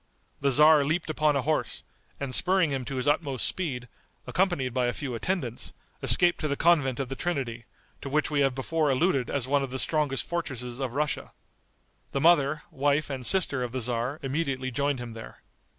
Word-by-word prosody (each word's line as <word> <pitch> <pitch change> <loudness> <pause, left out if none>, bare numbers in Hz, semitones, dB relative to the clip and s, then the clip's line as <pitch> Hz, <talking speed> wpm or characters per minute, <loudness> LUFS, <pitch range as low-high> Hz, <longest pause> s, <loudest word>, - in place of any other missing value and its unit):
The 140 - +1
tzar 150 +2 +6
leaped 160 +3 -1
upon 150 -1 +2
a 140 - 0
horse, 155 +3 -1 0.4
and 140 -2 -4
spurring 185 -2 +4
him 135 -2 -3
to 135 - -5
his 130 +2 -2
utmost 145 -4 +1
speed, 130 -9 -2 0.4
accompanied 175 -10 0
by 125 -1 +1
a 120 - -1
few 135 -1 -5
attendants, 125 -2 -3 0.3
escaped 175 -1 +4
to 155 - -1
the 140 - -1
convent 145 -6 +2
of 135 - -2
the 135 - -5
Trinity, 130 -8 -3 0.4
to 140 - -6
which 150 +2 0
we 145 - +1
have 135 -2 +2
before 155 +3 0
alluded 135 -1 +1
as 135 -3 -2
one 140 +1 +2
of 135 - -3
the 130 - -4
strongest 145 -1 0
fortresses 130 -8 -4
of 130 -3 -3
Russia. 150 0 -2 0.8
The 140 - 0
mother, 150 -3 +3
wife 145 +2 0
and 130 -2 -5
sister 145 -4 +3
of 125 -1 -4
the 130 - -2
tzar, 120 +4 -2
immediately 135 -2 -2
joined 140 +3 0
him 120 -2 -7
there. 115 0 -11
140 Hz, 195 wpm, -27 LUFS, 130-155 Hz, 0.8 s, tzar